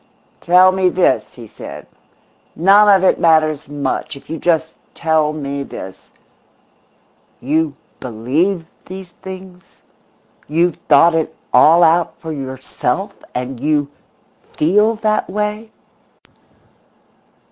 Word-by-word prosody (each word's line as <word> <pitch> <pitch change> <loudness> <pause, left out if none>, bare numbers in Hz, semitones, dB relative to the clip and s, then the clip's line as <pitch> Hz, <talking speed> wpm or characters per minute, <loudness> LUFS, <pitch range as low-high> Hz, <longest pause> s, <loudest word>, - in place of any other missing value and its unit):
"Tell 180 +2 +5
me 185 -1 +1
this," 180 0 0
he 120 -3 -11
said. 105 - -10 0.7
"None 200 +5 +5
of 190 -2 +5
it - - +2
matters 155 -3 +2
much, 145 +1 -3
if 140 - -13
you 165 - -4
just 160 -1 0 0.2
tell 160 -2 +1
me 140 -2 -5
this: 95 -8 -9 1.3
You 150 +2 -1 0.2
believe 145 - -1 0.2
these 185 -1 -9
things? 185 -1 -10 0.9
You've 170 +2 +1
thought 160 +3 +6
it 160 -1 -1 0.2
all 170 +3 +6
out 165 +1 +2
for 160 - -7
yourself 135 +6 -4 0.2
and 125 0 -4
you 145 0 0 0.7
feel 210 +8 +3
that 215 -1 -1
way? 210 +2 -3
160 Hz, 110 wpm, -17 LUFS, 145-185 Hz, 1.3 s, thought